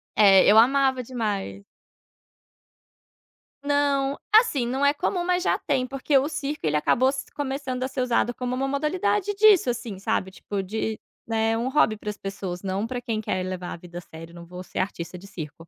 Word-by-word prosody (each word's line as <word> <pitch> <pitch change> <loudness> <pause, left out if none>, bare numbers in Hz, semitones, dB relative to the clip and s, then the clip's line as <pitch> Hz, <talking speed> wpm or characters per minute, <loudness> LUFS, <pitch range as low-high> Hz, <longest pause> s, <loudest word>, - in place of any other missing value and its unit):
É, 195 -3 +7
eu 215 - +6
amava 265 +2 +4
demais. 205 - -3 2.0
Não, 285 -1 +1 0.2
assim, 430 - +5
não 265 +4 0
é 285 - +4
comum, 350 +4 -1
mas 360 0 +1
já - - +2
tem, 265 -3 0
porque 275 +2 +1
o 280 +3 +1
circo 300 -1 -4
ele 150 0 +2
acabou 255 +11 +3
s 270 -1 -3
começando 265 -2 -3
a - - 0
ser 255 - -3
usado 245 -1 +1
como 250 0 -3
uma 270 +1 -1
modalidade 360 +8 0
disso, 405 - +5
assim, 230 -5 -4
sabe, 190 -1 -1
tipo, 195 +1 -5
de, 220 +2 -3 0.3
né, 225 0 +1
um 240 +3 -1
hobby 260 -6 +2
para 210 - -6
as 210 - -5
pessoas. 195 -2 -6
Não 195 +3 -2
para 245 0 -4
quem 225 -3 -2
quer 185 -3 -2
levar 185 -1 -5
a - - -7
vida 175 0 -11
a - - -5
sério, 165 +1 -12
não 170 0 -11
vou 180 +1 -9
ser - - -6
artista 180 -2 -4
de 195 +3 -13
circo. 155 -6 -7
240 Hz, 195 wpm, -25 LUFS, 195-275 Hz, 2.0 s, É